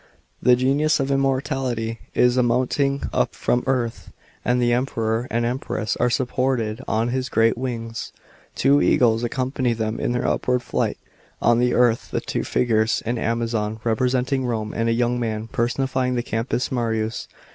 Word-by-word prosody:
The 125 - +6
g< 125 +1 -1
uius 155 +2 +2
of 135 0 0
immortality 130 -4 -1 0.2
is 125 0 +4
mounting 130 +3 +1
up - - 0
from 120 - 0
earth, 125 -3 -1 0.3
and 125 0 +1
the 120 -1 +2
Emperor 115 -2 -1
and 115 +1 0
Empress 120 -2 -2
are - - +2
supported 125 -2 0
on 115 +2 0
his 130 +1 -2
great 115 +1 +3
wings. 115 -2 -5 0.4
Two 140 +1 +4
eagles 115 -2 +3
accompany 130 0 -1
them 110 0 -2
in - - -1
their 125 +1 -1
upward 125 0 0
flight. - - -1 0.4
On 120 0 +3
the 125 0 +2
earth 120 -2 +2
are - - +2
two - - -3
figures 110 -2 +1
— - - -28
an 120 +1 -1
Amazon, 115 -2 -1
representing 125 +3 +1
Rome, 110 -3 -2
and 115 0 0
a - - +3
young 120 +1 +1
man, 110 -2 -3
personifying 125 +1 0
the 120 - -1
Campus 115 +3 -2
Martius. 115 -3 -1
120 Hz, 165 wpm, -22 LUFS, 115-130 Hz, 0.4 s, The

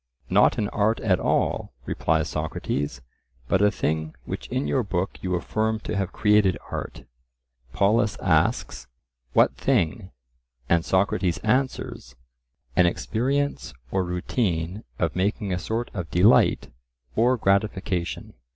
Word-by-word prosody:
Not - - +5
an 105 - 0
art 110 +2 +1
at 95 -5 +2
all, - - 0
replies - - 0
Socrates, 75 -3 -3 0.5
but 95 +4 +2
a 105 - +6
thing 80 -5 -2
which - - -5
in 130 +2 -2
your 130 - +1
book 95 -4 -3
you 90 -1 -1
affirm 110 +5 -1
to - - -4
have 95 -2 -1
created 105 -3 +3
art. - - -5 0.7
Polus 105 - +2
asks, 65 0 +1 0.5
"What - - +4
thing?" 100 - 0 0.6
and 85 -1 +3
Socrates 95 -2 +1
answers, 115 - -1 0.6
An 90 - +5
experience 125 - -1 0.2
or 95 - +1
routine 90 +1 -2
of 85 -3 -1
making 100 +1 -1
a 90 - -1
sort 115 +4 -3
of 90 -5 -5
delight 95 +7 +4 0.4
or 125 +3 +3
gratification. 100 -4 -1
100 Hz, 125 wpm, -25 LUFS, 85-110 Hz, 0.7 s, a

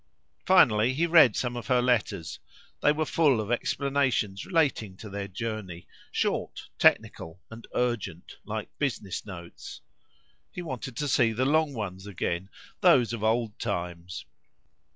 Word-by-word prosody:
Finally, 125 - +5
he 165 +4 +2
read 160 -6 +6
some 125 -1 -2
of 120 - -6
her 125 -2 +3
letters; 120 -9 0 0.4
they 150 - +5
were 155 +1 0
full 145 -7 +3
of 110 +2 -3
explanations 130 -6 0
relating 140 - 0
to 105 0 -10
their 100 0 -4
journey, 100 -4 -6 0.2
short, - - -2
technical, 80 +2 +2
and 115 0 -10
urgent, 120 -3 -2
like - - -5
business 110 -9 -3
notes. 85 -3 -9 0.7
He 180 - -6
wanted 130 -5 -6
to 145 - -1
see 120 -3 +3
the 125 +4 0
long 150 0 +2
ones 95 -3 -5
again, 95 -1 -3 0.3
those 120 -2 +5
of 110 -2 -4
old 110 -1 0
times. 90 -4 -4
115 Hz, 140 wpm, -27 LUFS, 100-135 Hz, 0.7 s, read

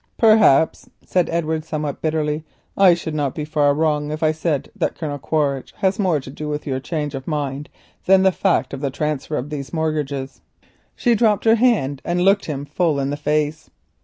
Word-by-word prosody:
"Perhaps," 215 - +4 0.2
said 180 -2 +1
Edward, 160 -1 -1
somewhat 150 -3 -4
bitterly, 155 -1 -1 0.3
"I 190 -3 +6
should 165 -2 -5
not 145 -3 -1
be 150 - -3
far 145 -2 +2
wrong 150 -1 0
if 155 +1 -4
I 155 - +4
said 155 -3 -2
that - - -1
Colonel 145 -3 -4
Quaritch 140 -2 -1
has 195 -1 0
more 180 -7 +2
to 130 -1 -10
do 150 +2 -6
with 150 0 -4
your 130 -2 -2
change 150 +1 -3
of 135 -1 -6
mind 145 -2 -3 0.4
than 190 0 +6
the 190 - +5
fact 190 -4 0
of 135 - -5
the 140 - 0
transfer 150 +1 -2
of 140 +4 -5
these 140 -2 -5
mortgages." 150 -4 -3 0.5
She 240 - +2
dropped 215 -2 +2
her 225 - +6
hand 215 - +2
and 175 +1 -1
looked 200 +1 +4
him 145 -2 -4
full 150 0 0
in 135 0 -1
the - - -1
face. 150 +1 -1
155 Hz, 195 wpm, -21 LUFS, 145-170 Hz, 0.5 s, I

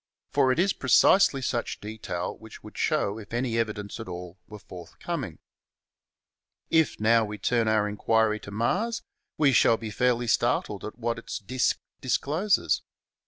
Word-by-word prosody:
For 130 - +3
it 130 - 0
is 190 +3 +2
precisely 135 +2 +4
such 120 -2 -2
detail 105 -4 -5
which 110 -1 -12
should 105 - -12
show 115 -9 0
if 110 +2 -8
any 120 -2 0
evidence 105 -1 -3
at 115 - -7
all 90 0 -8
were 105 - -10
forthcoming. 90 -4 -7 1.3
If, 160 -2 +2
now, 115 +1 +4
we 105 0 -5
turn 115 +3 +1
our 110 -1 +2
inquiry 110 +1 +1
to - - -10
Mars, 185 - -1 0.3
we 150 -3 +4
shall 115 -1 +5
be 110 -1 -6
fairly 120 +2 +1
startled 115 - 0
at 110 - -7
what 115 -1 -2
its - - -6
disk 125 +5 0 0.2
discloses. 155 +9 +1
115 Hz, 155 wpm, -27 LUFS, 105-130 Hz, 1.3 s, shall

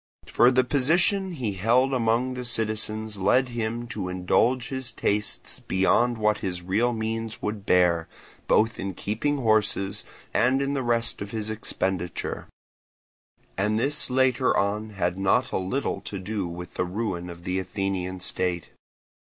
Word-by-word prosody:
For 120 - +4
the 130 0 +3
position 175 +9 +2
he 120 -10 -2
held 120 +8 +2
among 120 +1 +1
the 125 0 -5
citizens 110 -2 -1
led 125 +7 +3
him 120 0 -3
to 100 -5 -4
indulge 115 +7 +1
his 130 -2 -3
tastes 105 -2 -1
beyond 115 +6 +2
what 105 -1 +1
his 90 -2 -3
real 105 +7 +1
means 115 0 -3
would 105 -1 -4
bear, 85 -2 +3 0.4
both 115 +2 +3
in 95 -1 -4
keeping 115 - -1
horses 110 -5 +1 0.3
and 130 +3 +3
in 140 0 -1
the 140 - 0
rest 120 -3 0
of 100 - -5
his 110 0 -3
expenditure; 95 -5 -2 1.1
and 105 +3 +1
this 145 +4 +1
later 130 0 +2
on 105 +2 0
had 90 -3 -2
not 100 +6 +2
a - - 0
little 95 +10 -2
to 100 - -6
do 100 0 -3
with 85 +1 -8
the 90 - -1
ruin 90 -2 -3
of 85 0 -10
the 90 +1 -1
Athenian 95 -1 -3
state. 90 -2 -1
110 Hz, 150 wpm, -26 LUFS, 95-125 Hz, 1.1 s, For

